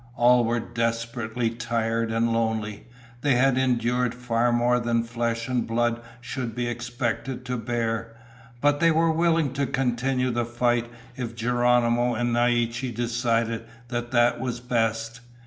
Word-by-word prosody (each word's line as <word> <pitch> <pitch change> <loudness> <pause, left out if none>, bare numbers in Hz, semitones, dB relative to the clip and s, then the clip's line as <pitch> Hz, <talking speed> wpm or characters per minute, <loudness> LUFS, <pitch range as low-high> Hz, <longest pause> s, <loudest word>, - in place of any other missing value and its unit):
All 120 0 +5
were 120 +1 +1
desperately 115 0 -2
tired 115 -1 -1
and 115 +1 +1
lonely. 110 -2 -2 0.3
They 140 -3 +3
had 130 +1 +4
endured 125 -1 +1
far 120 -1 +1
more 120 +1 +3
than 115 -1 +1
flesh 115 0 -2
and 125 -2 -1
blood 120 +1 0 0.2
should 120 -2 -5
be 120 - -1
expected 120 +1 -3
to 125 0 -2
bear. 115 -1 -2 0.5
But 145 0 +3
they 165 - +5
were 165 0 +3
willing 165 -4 +2
to 140 0 -1
continue 125 0 0
the 120 0 0
fight 120 0 0 0.3
if 120 -2 -5
Geronimo 120 0 +2
and 120 +1 0
Naiche 120 +1 +1
decided 115 -1 0 0.3
that 120 -1 -3
that 120 -1 +3
was 125 -2 -3
best. 115 -1 -1
120 Hz, 145 wpm, -25 LUFS, 115-125 Hz, 0.5 s, All